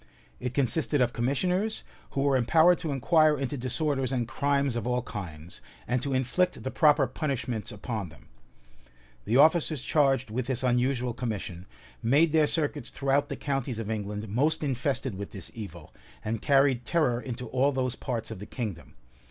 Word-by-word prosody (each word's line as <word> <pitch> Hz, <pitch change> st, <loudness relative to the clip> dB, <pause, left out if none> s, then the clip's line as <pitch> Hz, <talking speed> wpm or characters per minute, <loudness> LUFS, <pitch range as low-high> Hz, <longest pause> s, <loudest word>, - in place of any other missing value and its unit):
It 125 Hz, 0 st, -4 dB
consisted 145 Hz, +2 st, +1 dB
of 125 Hz, -1 st, +2 dB
commissioners, 180 Hz, -, 0 dB, 0.3 s
who 135 Hz, -, 0 dB
were 140 Hz, -1 st, +3 dB
empowered 160 Hz, +8 st, +5 dB
to 160 Hz, -4 st, -3 dB
inquire 155 Hz, +3 st, +4 dB
into 135 Hz, +1 st, -2 dB
disorders 135 Hz, +1 st, -1 dB
and 120 Hz, -3 st, -1 dB
crimes 140 Hz, 0 st, 0 dB
of 120 Hz, -1 st, -2 dB
all 125 Hz, 0 st, 0 dB
kinds, 85 Hz, -7 st, -8 dB, 0.3 s
and 125 Hz, +1 st, 0 dB
to 135 Hz, 0 st, -1 dB
inflict 155 Hz, +8 st, 0 dB
the 130 Hz, -, -3 dB
proper 145 Hz, +1 st, +4 dB
punishments 125 Hz, -4 st, -3 dB
upon 105 Hz, -2 st, -4 dB
them. 75 Hz, -, -18 dB, 1.0 s
The 115 Hz, +4 st, +2 dB
officers 155 Hz, -2 st, +4 dB
charged 135 Hz, -6 st, +2 dB
with 120 Hz, +2 st, -2 dB
this 130 Hz, -1 st, -2 dB
unusual 125 Hz, 0 st, +1 dB
commission, 105 Hz, -7 st, -5 dB, 0.3 s
made 145 Hz, +7 st, +4 dB
their 155 Hz, -1 st, +4 dB
circuits 145 Hz, -5 st, -1 dB
throughout 140 Hz, +1 st, 0 dB
the -, -, -3 dB
counties 135 Hz, -4 st, -2 dB
of 110 Hz, -1 st, -4 dB
England 105 Hz, 0 st, -4 dB
most 150 Hz, +10 st, +1 dB
infested 130 Hz, -2 st, -1 dB
with 100 Hz, -, -5 dB
this 95 Hz, -4 st, -6 dB
evil, 105 Hz, -3 st, -9 dB, 0.3 s
and 110 Hz, 0 st, -2 dB
carried 135 Hz, -3 st, +3 dB
terror 130 Hz, -8 st, +1 dB
into 125 Hz, -1 st, -5 dB
all 130 Hz, +3 st, +2 dB
those 130 Hz, -2 st, -1 dB
parts 120 Hz, -4 st, -4 dB
of -, -, -6 dB
the 105 Hz, -, -8 dB
kingdom. 105 Hz, -9 st, -6 dB
130 Hz, 170 wpm, -28 LUFS, 115-145 Hz, 1.0 s, empowered